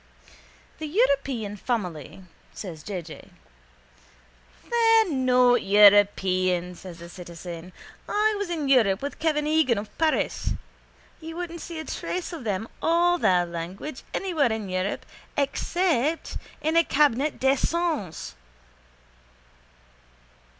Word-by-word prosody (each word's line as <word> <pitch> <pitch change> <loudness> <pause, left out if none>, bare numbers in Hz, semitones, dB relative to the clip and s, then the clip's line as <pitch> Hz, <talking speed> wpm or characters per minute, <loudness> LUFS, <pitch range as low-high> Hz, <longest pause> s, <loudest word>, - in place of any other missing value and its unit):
—The 310 - -4
European 275 - +1
family, 190 - -4 0.3
says 170 -6 -7
J. 185 +1 -5
J.... 160 -1 -12 1.4
—They're 450 -4 +4
not 250 -2 +4
European, 190 -3 +4
says 180 -1 -10
the 170 0 -10
citizen. 175 0 -9 0.4
I 430 +1 +2
was 405 -3 -3
in 315 -5 -2
Europe 225 -6 +3
with 285 - -5
Kevin 300 -2 +1
Egan 305 -6 +3
of 205 +1 -6
Paris. 320 -1 0 0.7
You 325 0 -8
wouldn't 340 -1 -5
see 335 - -7
a 315 - -5
trace 360 0 -4
of 305 -8 -7
them 205 +1 -2
or 350 +1 +3
their 180 - +3
language 175 - -6
anywhere 325 -10 0
in 220 -3 -3
Europe 185 +2 -2 0.3
except 315 +1 0 0.3
in 315 +2 +1
a 335 - +6
_cabinet 290 -1 +2
d'aisance. 275 - 0
255 Hz, 115 wpm, -25 LUFS, -, 1.4 s, a